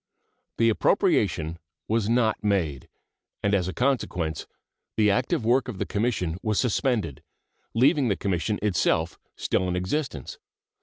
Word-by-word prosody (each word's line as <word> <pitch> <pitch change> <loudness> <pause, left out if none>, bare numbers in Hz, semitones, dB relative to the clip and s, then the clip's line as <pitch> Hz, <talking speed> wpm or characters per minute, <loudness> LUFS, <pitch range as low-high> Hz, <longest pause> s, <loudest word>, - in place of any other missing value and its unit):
The 115 0 +4
appropriation 85 -6 +1 0.3
was 110 -1 +1
not 115 -3 +2
made, 85 -11 0 0.5
and 100 - +2
as 90 -3 +2
a - - -2
consequence 95 - -1 0.5
the 105 -2 +4
active 125 - 0
work 125 +3 +3
of 120 -6 -5
the - - -2
Commission 100 -6 -1
was 110 -2 0
suspended, 110 - 0 0.5
leaving 135 +3 +4
the 100 - +2
Commission 100 +2 -1
itself 85 -4 +1 0.2
still 95 - 0
in 90 - -1
existence. 100 +12 -3
105 Hz, 135 wpm, -26 LUFS, 90-120 Hz, 0.5 s, The